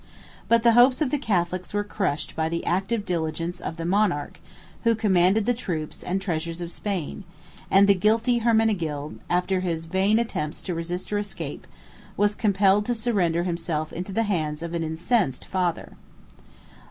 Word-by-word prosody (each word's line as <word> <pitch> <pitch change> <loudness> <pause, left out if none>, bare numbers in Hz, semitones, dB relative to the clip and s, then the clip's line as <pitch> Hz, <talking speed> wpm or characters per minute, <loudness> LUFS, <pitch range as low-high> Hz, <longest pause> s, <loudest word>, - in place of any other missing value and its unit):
But 230 -1 +4
the 235 - +6
hopes 245 +2 +6
of 300 -5 0
the 295 - +1
Catholics 185 -5 -1
were 205 - +1
crushed 190 -8 -2
by 160 0 0
the 170 0 -3
active 195 +5 0
diligence 165 0 -2
of 165 - -5
the 165 - -4
monarch 180 -6 0 0.4
who 230 -1 +3
commanded 200 -1 +3
the 245 - +3
troops 170 -10 -4
and 185 +2 -1
treasures 165 -2 -3
of 170 -1 -4
Spain; 195 -2 -3 0.5
and 195 +1 +6
the 200 - +7
guilty 225 +5 +2
Hermenegild, 205 -11 0
after 180 +2 +1
his 165 -3 -2
vain 190 +5 +2
attempts 185 -10 -2
to 180 - -3
resist 175 +4 -4
or - - +2
to - - +1
escape, 205 0 -6 0.5
was 205 0 +3
compelled 200 -1 +2
to 240 - +1
surrender 195 -8 +1
himself 165 -3 -2
into 180 +4 -5
the 225 +4 +1
hands 160 -7 -2
of 170 0 -5
an 170 -1 -1
incensed 160 - 0
father. 180 -3 -2
185 Hz, 170 wpm, -25 LUFS, 165-210 Hz, 0.5 s, the